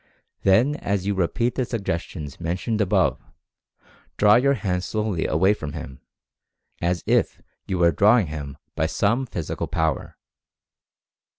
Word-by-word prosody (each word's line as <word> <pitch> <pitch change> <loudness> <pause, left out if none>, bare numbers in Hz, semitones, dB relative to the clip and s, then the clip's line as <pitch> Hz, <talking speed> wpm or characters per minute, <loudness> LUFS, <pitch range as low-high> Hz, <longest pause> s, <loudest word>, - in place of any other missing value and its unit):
Then 120 +10 +3
as 100 -1 -2
you 100 - +1
repeat 100 +6 0
the 130 - -1
sug 115 -4 -4
gestions 80 -5 -4
mentioned 90 +6 -2
above, 100 - +2 1.0
draw 105 0 +6
your 140 +3 +4
hands 95 -5 -2
slowly 105 -6 -1
away 95 +6 +3
from 75 -7 -6
him, 65 -5 -8 0.8
as 85 -1 0
if - - +1 0.3
you 95 - -1
were 85 -1 +4
"drawing" 105 +7 +4
him 75 -3 -7 0.2
by 80 - +1
some 105 +10 0
physical 85 -3 -4
power. 80 -2 -2
95 Hz, 135 wpm, -23 LUFS, 80-105 Hz, 1.0 s, draw